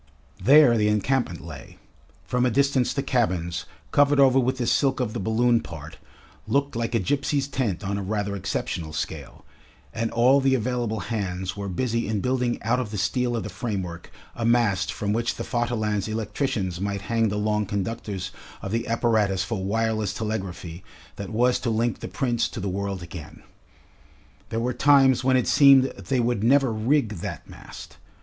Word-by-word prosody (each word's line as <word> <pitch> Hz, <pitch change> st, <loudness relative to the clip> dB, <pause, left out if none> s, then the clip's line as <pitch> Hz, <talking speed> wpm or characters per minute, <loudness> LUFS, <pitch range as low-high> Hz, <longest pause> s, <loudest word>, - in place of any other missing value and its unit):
There 140 Hz, -3 st, +6 dB
the 105 Hz, -, +2 dB
encampment 105 Hz, -3 st, 0 dB
lay; 75 Hz, -6 st, -10 dB, 0.5 s
from 125 Hz, 0 st, 0 dB
a 125 Hz, -, +3 dB
distance 135 Hz, +1 st, +2 dB
the 140 Hz, -, -2 dB
cabins, 90 Hz, -10 st, -1 dB, 0.3 s
covered 145 Hz, 0 st, +4 dB
over 135 Hz, -1 st, +6 dB
with 130 Hz, +1 st, 0 dB
the 125 Hz, -, -1 dB
silk 135 Hz, +2 st, +2 dB
of 120 Hz, -4 st, -1 dB
the -, -, -3 dB
balloon 115 Hz, +3 st, +2 dB
part, 80 Hz, -2 st, -10 dB, 0.5 s
looked 140 Hz, -1 st, 0 dB
like 115 Hz, 0 st, -2 dB
a -, -, +3 dB
gipsy's 140 Hz, +6 st, 0 dB
tent 120 Hz, -10 st, -2 dB
on 100 Hz, +1 st, -2 dB
a -, -, -3 dB
rather 100 Hz, 0 st, -2 dB
exceptional 90 Hz, -4 st, -3 dB
scale, -, -, -6 dB, 0.5 s
and 115 Hz, 0 st, -1 dB
all 130 Hz, +4 st, +4 dB
the 135 Hz, 0 st, +3 dB
available 120 Hz, -3 st, -2 dB
hands 95 Hz, -3 st, -3 dB
were 100 Hz, -1 st, -5 dB
busy 115 Hz, +4 st, -1 dB
in 105 Hz, -1 st, -1 dB
building 125 Hz, +1 st, 0 dB
out 120 Hz, +3 st, +1 dB
of 125 Hz, -4 st, -3 dB
the 105 Hz, -, -5 dB
steel 120 Hz, +5 st, 0 dB
of 115 Hz, -, -2 dB
the 105 Hz, -, -5 dB
framework 95 Hz, -4 st, -5 dB, 0.3 s
a 120 Hz, -, -4 dB
mast 115 Hz, -5 st, +2 dB
from 105 Hz, 0 st, -2 dB
which 115 Hz, +2 st, -1 dB
the -, -, -5 dB
Vaterland's 110 Hz, -5 st, -1 dB
electricians 110 Hz, -, -2 dB
might 100 Hz, 0 st, -2 dB
hang 115 Hz, +2 st, +1 dB
the 105 Hz, -, -2 dB
long 105 Hz, 0 st, 0 dB
conductors 100 Hz, -1 st, -4 dB, 0.3 s
of 95 Hz, -, -4 dB
the 115 Hz, +2 st, -1 dB
apparatus 110 Hz, -5 st, +1 dB
for 95 Hz, -1 st, -3 dB
wireless 110 Hz, 0 st, -1 dB
telegraphy 95 Hz, -5 st, -5 dB, 0.3 s
that 100 Hz, -2 st, -6 dB
was 120 Hz, +3 st, +2 dB
to 120 Hz, -, -2 dB
link 115 Hz, +1 st, 0 dB
the -, -, -6 dB
Prince 120 Hz, -3 st, 0 dB
to -, -, -7 dB
the 100 Hz, -, -3 dB
world 100 Hz, -1 st, -3 dB
again. 85 Hz, -3 st, -10 dB, 1.1 s
There 115 Hz, -, -2 dB
were 125 Hz, +2 st, -1 dB
times 135 Hz, -3 st, +4 dB
when 130 Hz, 0 st, +4 dB
it 125 Hz, -, 0 dB
seemed 140 Hz, -3 st, +7 dB
they 130 Hz, -2 st, -2 dB
would 120 Hz, -3 st, 0 dB
never 135 Hz, 0 st, +4 dB
rig 110 Hz, -1 st, +1 dB
that -, -, -6 dB
mast. -, -, -12 dB
115 Hz, 180 wpm, -25 LUFS, 100-125 Hz, 1.1 s, seemed